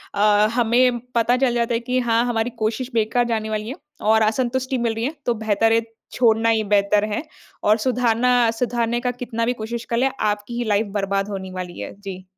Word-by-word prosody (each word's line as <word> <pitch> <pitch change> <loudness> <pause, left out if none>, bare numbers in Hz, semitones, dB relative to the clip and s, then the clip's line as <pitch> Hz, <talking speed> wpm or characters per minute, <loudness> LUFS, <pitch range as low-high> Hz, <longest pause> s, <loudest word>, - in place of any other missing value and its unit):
अ, 210 +1 +4
हमें 240 +1 +3 0.2
पता 235 +2 +3
चल 255 -2 +2
जाता 235 0 0
है 230 - +1
कि 250 +2 -1
हाँ, 235 -1 +2
हमारी 235 -1 0
कोशिश 235 +4 -2
बेकार 230 +2 +1
जाने 220 -2 -2
वाली 215 +1 -3
है। 265 - -5 0.3
और 220 +1 +3
असंतुष्टी 255 +4 0
मिल 235 -2 0
रही 225 - -4
है 290 - -2
तो 240 - +2
बेहतर 220 +1 +2
है, 230 - +3 0.3
छोड़ना 230 -2 +3
ही 220 -1 +2
बेहतर 205 0 +2
है। 245 - -2 0.4
और 215 +1 +4
सुधारना 250 0 +2 0.2
सुधारने 235 0 -1
का 250 0 0
कितना 235 -2 -3
भी 245 - +1
कोशिश 235 +1 -5
कर 235 - 0
लें 265 +2 +2
आपकी 210 +2 -2
ही 240 - -1
लाइफ़ 215 -1 +1
बर्बाद 195 0 -1
होनी 190 -2 -5
वाली 180 -1 -6
है। - - -6
जी। 190 -2 -7
230 Hz, 210 wpm, -22 LUFS, 215-245 Hz, 0.4 s, अ